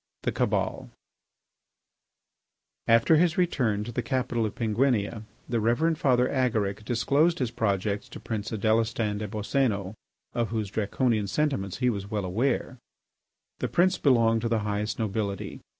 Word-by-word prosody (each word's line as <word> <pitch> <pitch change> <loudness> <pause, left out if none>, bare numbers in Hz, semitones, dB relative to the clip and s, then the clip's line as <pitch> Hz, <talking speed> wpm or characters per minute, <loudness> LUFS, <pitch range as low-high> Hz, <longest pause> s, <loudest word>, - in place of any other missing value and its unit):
III. - - -58
THE - - 0
CABAL - - -1 2.0
After 115 +8 +5
his 170 0 +2
return 125 - +1
to 120 - -6
the 120 - -2
capital 120 -1 -1
of 105 - -8
Penguinia, 110 -2 0 0.2
the 120 -1 0
Reverend 150 +9 +1
Father 125 -3 +3
Agaric 110 -6 0
disclosed 140 +10 +2
his 125 -4 -1
projects 105 0 -1
to - - -9
Prince 110 -1 -4
Adélestan 110 -1 0
des 105 - -3
Boscénos, 105 -2 -1 0.4
of 120 -2 -1
whose 110 -3 -3
Draconian 110 0 0
sentiments 100 -8 -1
he 125 -1 +2
was 100 -2 -5
well 105 -3 -2
aware. 120 +6 -1 0.8
The - - -1
prince 180 +1 +2
belonged 115 -5 +3
to 115 - -1
the 115 -2 +1
highest 105 +1 -2
nobility. 100 -3 -3
115 Hz, 145 wpm, -27 LUFS, 105-125 Hz, 2.0 s, After